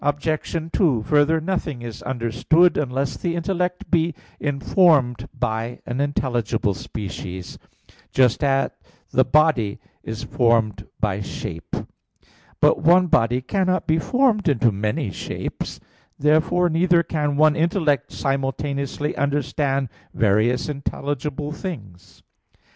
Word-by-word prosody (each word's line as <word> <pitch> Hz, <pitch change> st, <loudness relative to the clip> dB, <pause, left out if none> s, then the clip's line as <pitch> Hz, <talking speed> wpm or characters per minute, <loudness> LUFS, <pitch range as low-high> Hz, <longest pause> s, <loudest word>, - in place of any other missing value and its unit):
2: 140 Hz, -, +2 dB
Further, 150 Hz, +4 st, +3 dB
nothing 160 Hz, -7 st, -3 dB
is 115 Hz, -2 st, -7 dB
understood 130 Hz, +8 st, +2 dB
unless 135 Hz, -1 st, -1 dB
the 170 Hz, -1 st, -2 dB
intellect 180 Hz, +1 st, -2 dB
be 165 Hz, -1 st, +2 dB, 0.2 s
informed 140 Hz, -, +2 dB
by 115 Hz, 0 st, -3 dB
an 125 Hz, +3 st, -2 dB
intelligible 120 Hz, -7 st, 0 dB
species; 95 Hz, -2 st, -7 dB, 0.5 s
just 125 Hz, -1 st, +3 dB
at 135 Hz, -1 st, +2 dB, 0.4 s
the 130 Hz, -, +4 dB
body 130 Hz, -6 st, +2 dB, 0.2 s
is 110 Hz, 0 st, -6 dB
formed 115 Hz, -4 st, +1 dB
by 105 Hz, -2 st, 0 dB
shape. 80 Hz, -6 st, -6 dB, 0.8 s
But -, -, +4 dB
one 175 Hz, +4 st, +5 dB
body 120 Hz, 0 st, +2 dB
cannot 185 Hz, +5 st, 0 dB
be 160 Hz, +1 st, +2 dB
formed 235 Hz, -, +2 dB
into 120 Hz, -4 st, +3 dB
many 105 Hz, +4 st, -2 dB
shapes. -, -, -5 dB, 0.4 s
Therefore 160 Hz, +5 st, +3 dB
neither 170 Hz, +1 st, +3 dB
can 150 Hz, -3 st, -1 dB
one 155 Hz, 0 st, +5 dB
intellect 160 Hz, -, +1 dB
simultaneously 140 Hz, +1 st, -2 dB
understand 140 Hz, -1 st, 0 dB, 0.3 s
various 110 Hz, +4 st, +2 dB
intelligible 145 Hz, 0 st, -3 dB
things. 105 Hz, -, -8 dB
140 Hz, 110 wpm, -22 LUFS, 120-160 Hz, 0.8 s, one